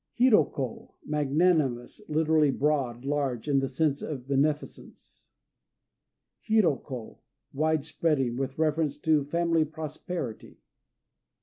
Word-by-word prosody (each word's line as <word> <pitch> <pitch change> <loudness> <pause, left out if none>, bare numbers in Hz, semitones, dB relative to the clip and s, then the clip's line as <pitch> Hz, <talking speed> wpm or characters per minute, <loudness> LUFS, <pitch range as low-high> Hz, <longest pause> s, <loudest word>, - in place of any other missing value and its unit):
Hiro 240 - +5
ko 130 -5 -6
"Magnanimous," 150 - +1
literally, 155 -1 +3
"broad," 135 -4 0
"large," 140 -4 -1
in 140 -2 +3
the 135 - -1
sense 140 +1 0
of 130 -4 -6
beneficence. 145 +2 -3 1.1
Hiro 215 -10 +2
ko 125 -6 -9 0.3
"Wide 155 0 +1
Spreading," 150 -6 0
with 135 +1 -3
reference 155 -2 0
to 155 -1 +2
family 165 +2 +1
prosperity. 155 -4 -6
150 Hz, 105 wpm, -28 LUFS, 135-160 Hz, 1.1 s, Hiro